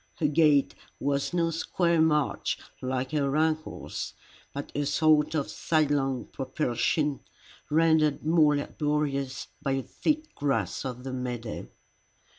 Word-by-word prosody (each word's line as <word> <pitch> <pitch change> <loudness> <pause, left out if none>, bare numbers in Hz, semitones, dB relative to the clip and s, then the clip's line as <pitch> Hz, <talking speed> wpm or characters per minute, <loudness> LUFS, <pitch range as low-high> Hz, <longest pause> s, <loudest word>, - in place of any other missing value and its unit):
Her 160 - -1
gait 150 -1 +4 0.3
was 140 0 0
no 170 -2 +1
square 170 0 +1
march 150 -2 +1 0.2
like 130 0 -2
her 140 -2 +1
uncle's, 155 0 -2 0.4
but 140 +1 -6
a 145 0 -1
sort 155 +1 +3
of 145 -3 0
sidelong 145 -5 0
propulsion, 135 +2 -1 0.5
rendered 155 -2 +3
more 155 -2 +5
laborious 145 -2 -2
by 135 -2 0
the 135 - -2
thick 310 - -2
grass 140 -1 -1
of 125 -1 -5
the 130 -1 -5
meadow. 120 -3 -4
145 Hz, 120 wpm, -28 LUFS, 135-155 Hz, 0.5 s, more